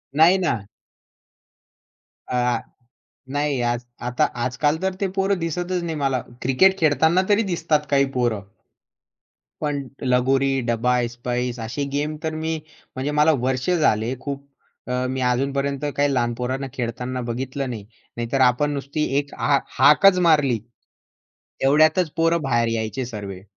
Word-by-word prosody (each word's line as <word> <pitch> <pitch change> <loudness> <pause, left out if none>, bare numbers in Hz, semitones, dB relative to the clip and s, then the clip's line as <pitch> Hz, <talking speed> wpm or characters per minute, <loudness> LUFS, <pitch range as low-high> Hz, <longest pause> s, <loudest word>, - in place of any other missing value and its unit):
नाही 165 +5 +6
ना. 125 - -1 1.6
अ, 125 -2 +1 0.7
नाही 145 -2 0
आज 120 0 0 0.3
आता 125 - +2 0.2
आजकाल 145 +5 +1
तर 190 0 0
ते 200 - +1
पोरं 195 0 +1
दिसतच 175 +2 -2
नाही 165 -1 -3
मला. 135 -2 +1 0.2
क्रिकेट 190 +10 +4
खेळताना 160 +3 +3
तरी 210 +2 +4
दिसतात 165 -3 +1
काही 140 -1 +4
पोरं. 120 -4 0 1.2
पण 145 -3 -2 0.2
लगोरी, 130 +2 +2 0.2
डब्बा 125 +2 +1
ऐसपैस 120 0 -3
असे 120 +6 -3
गेम 150 +2 -1
तर 160 - -2
मी 160 0 -1 0.4
म्हणजे 135 +3 -2
मला 150 +2 +6 0.2
वर्ष 130 +4 -1
झाले 130 -9 +2
खूप 140 0 -6 0.4
अ, 125 0 0
मी 130 0 -2
अजूनपर्यंत 140 +2 -1 0.2
काही 145 0 +2
लहान 120 -2 +1
पोरांना 130 +3 -3
खेळताना 125 0 -3
बघितलं 130 +3 -3
नाही. 110 -5 -6 0.3
नाहीतर 120 +3 -1
आपण 130 +4 +3
नुसती 140 +2 -3
एक 145 0 -2
हा 140 -1 +3 0.2
हाकच 180 +8 +6
मारली, 140 -8 +3 1.1
एवढ्यातच 155 +4 +4
पोरं 165 0 +2
बाहेर 120 -4 +1
यायचे 115 +3 -2
सर्वे. 100 -5 -7
135 Hz, 135 wpm, -22 LUFS, 125-155 Hz, 1.6 s, नाही